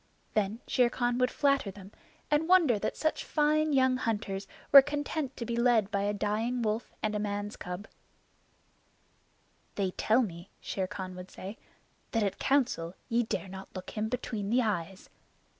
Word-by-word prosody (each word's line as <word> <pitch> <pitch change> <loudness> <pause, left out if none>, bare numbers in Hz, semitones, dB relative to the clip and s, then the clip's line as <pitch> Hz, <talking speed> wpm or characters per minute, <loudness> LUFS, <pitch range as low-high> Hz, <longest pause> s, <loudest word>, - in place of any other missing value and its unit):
Then 215 +2 0
Shere 250 -2 +3
Khan 245 0 0
would 250 0 +3
flatter 275 -7 +2
them 195 0 -11 0.4
and 305 +3 +2
wonder 325 - +5
that - - -2
such 315 - 0
fine 305 0 +2
young 260 -2 +4
hunters 205 -5 -2 0.2
were 275 - +12
content 290 0 -3
to 235 - -4
be 235 0 -2
led 235 -4 +3
by 200 - 0
a 205 +1 +1
dying 220 +4 -1
wolf 220 +2 -1
and 215 -1 0
a 210 - -1
man's 205 0 -3
cub. 180 +4 -6 1.9
"They 195 -2 0
tell 225 +7 +3
me," 170 -3 -7
Shere 190 -1 -3
Khan 185 -1 -6
would 180 +1 -9
say, 195 +3 -8 0.6
"that 225 -2 +2
at 200 - -2
Council 240 -11 +1
ye 235 +1 +3
dare 220 -3 -3
not 190 +1 -10
look 185 0 -6
him 215 0 -2
between 225 -4 -3
the 245 +3 +3
eyes." 190 -3 -3
220 Hz, 170 wpm, -30 LUFS, 200-255 Hz, 1.9 s, were